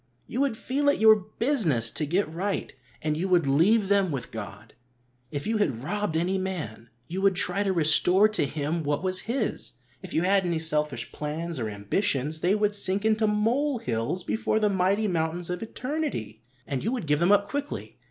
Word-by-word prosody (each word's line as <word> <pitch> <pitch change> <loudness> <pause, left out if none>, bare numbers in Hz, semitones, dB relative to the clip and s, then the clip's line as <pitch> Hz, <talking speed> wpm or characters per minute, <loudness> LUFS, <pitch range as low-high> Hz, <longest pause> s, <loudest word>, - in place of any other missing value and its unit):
You 255 - -3
would 275 -5 0
feel 285 +5 0
it 285 - +1
your 220 0 +8
business 210 - 0
to 150 - -2
get 180 +5 +1
right, 185 +6 -3 0.3
and 155 -1 0
you 175 +5 -1
would 175 -4 +3
leave 190 +10 +3
them 200 -1 +3
with 135 -5 -5
God. 110 0 -8 0.6
If 145 0 -5
you 220 +1 0
had 135 - -1
robbed 205 0 -1
any 185 +3 0
man, 150 - -5 0.2
you 185 +3 -4
would 195 -1 +3
try 180 +2 +2
to 200 -1 +1
restore 180 +4 +4
to 215 -9 0
him 155 +3 -2
what 145 +2 -1
was 185 0 +1
his. 235 -3 -1 0.3
If - - -9
you 160 - +2
had 195 +1 +3
any 170 -2 0
selfish 150 -6 -1
plans, 155 +1 -4
or 110 -2 -2
ambitions, 140 - -1
they 180 +5 +2
would 210 -1 +1
sink 200 0 +2
into 220 0 +3
mole 240 +7 +1
hills 125 - -2
before 220 +2 0
the 215 -1 +2
mighty 195 +3 +1
mountains 170 0 -1
of 180 - -4
eternity, 250 - -4 0.2
and 135 -2 -3
you 225 - 0
would 250 -9 -3
give 150 -1 +1
them 175 +3 +3
up 205 0 +4
quickly. 285 0 -5
185 Hz, 195 wpm, -26 LUFS, 150-210 Hz, 0.6 s, your